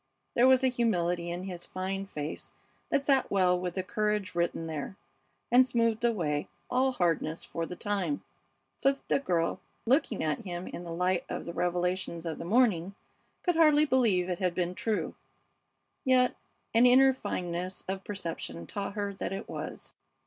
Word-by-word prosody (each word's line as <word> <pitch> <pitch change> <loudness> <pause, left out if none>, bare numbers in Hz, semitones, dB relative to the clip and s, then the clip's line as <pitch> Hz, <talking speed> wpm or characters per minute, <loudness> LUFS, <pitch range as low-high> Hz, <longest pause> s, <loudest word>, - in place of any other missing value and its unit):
There 245 +2 +5
was 260 0 +5
a - - +5
humility 180 -8 0
in 175 +1 -4
his 180 -2 -5
fine 195 +1 -4
face 150 -4 -5 0.4
that 280 - +1
sat 270 -2 +3
well 180 -2 +3
with 180 -1 -3
the 185 - -1
courage 210 +1 -1
written 170 -1 -1
there, 160 +3 -5 0.6
and 250 +2 +8
smoothed 230 -2 +1
away 165 -11 0 0.2
all 260 +1 +3
hardness 165 -5 0
for 165 0 -4
the 180 - -6
time, 205 +9 -1 0.6
so 275 - +4
that 275 - -19
the - - +3
girl, 170 -10 0 0.3
looking 245 -3 +2
at 155 -1 0
him 175 -2 -5
in 175 - -7
the 170 - -6
light 180 +1 +1
of - - -4
the 170 - -5
revelations 180 -1 -1
of 165 -2 -4
the - - -5
morning, 200 -4 +2 0.5
could 355 -2 +2
hardly 305 -2 +6
believe 225 -10 +3
it 180 -2 -2
had 180 -2 0
been 180 0 0
true, 215 +3 -1 0.9
yet 255 -2 +4 0.4
an 235 +2 +6
inner 265 +2 +7
fineness 180 -6 -3
of 190 0 -3
perception 165 - -4
taught 200 - -4
her 205 -1 -2
that 195 - -4
it 195 +2 -5
was. - - -7
190 Hz, 170 wpm, -30 LUFS, 175-240 Hz, 0.9 s, and